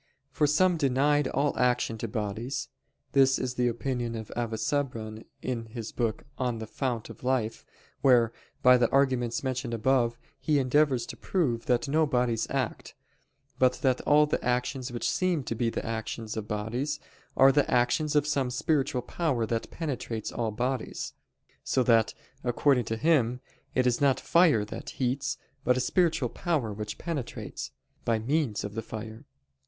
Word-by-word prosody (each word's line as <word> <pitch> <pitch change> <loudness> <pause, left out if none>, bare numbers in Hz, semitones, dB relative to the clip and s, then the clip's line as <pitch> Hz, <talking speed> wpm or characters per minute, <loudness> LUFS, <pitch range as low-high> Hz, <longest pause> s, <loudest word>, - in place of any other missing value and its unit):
For 150 - +2
some 175 +4 +3
denied 145 0 +2
all 140 +2 0
action 125 -2 +2
to 115 - -3
bodies. 110 - -3 0.4
This 135 -1 +5
is 125 -1 -2
the 125 -1 +1
opinion 120 0 -2
of 110 -1 -7
Avicebron 115 -1 -2 0.2
in 115 -3 -3
his 110 0 -6
book 115 -3 -1 0.2
on 125 -3 0
The 110 - -5
Fount 120 0 -3
of - - -14
Life, 125 -4 0 0.4
where, 120 -4 +5 0.3
by 125 0 +8
the 120 -1 +2
arguments 130 -4 +1
mentioned 130 -2 -2
above, 120 0 +2 0.2
he 150 -2 +2
endeavors 135 -1 +2
to - - -8
prove 125 -11 -1
that 125 +3 +2
no 155 +2 +3
bodies 125 -4 +1
act, - - -3 0.6
but 130 -1 +5
that 130 -2 +2
all 150 +1 +5
the 150 - -2
actions 125 +1 -1
which 120 - -2
seem 180 -6 +1
to 120 - -3
be 115 +1 0
the - - -4
actions 110 0 -4
of 110 -1 -4
bodies, 120 +8 -2 0.4
are 135 +1 +8
the 145 +1 +2
actions 125 +5 +2
of 150 -1 +4
some 140 -4 0
spiritual 135 -1 0
power 140 -10 0
that 115 +1 -2
penetrates 125 -8 -4
all 115 -2 -1
bodies: 125 +3 -3 0.5
so 130 - +1
that, 115 -3 +3 0.3
according 125 0 +2
to 115 - -2
him, 125 -4 +2 0.4
it 130 - +3
is 125 +1 +2
not 140 -2 +4
fire 160 -12 +4
that 105 - -7
heats, 135 +1 -1 0.3
but 125 +1 +3
a - - +2
spiritual 165 +4 +2
power 145 -11 -1
which 105 +1 -5
penetrates, 135 - -5 0.3
by 115 -1 +2
means 125 -1 0
of 100 - -5
the 115 - -3
fire. 110 0 -8
125 Hz, 165 wpm, -28 LUFS, 115-140 Hz, 0.6 s, by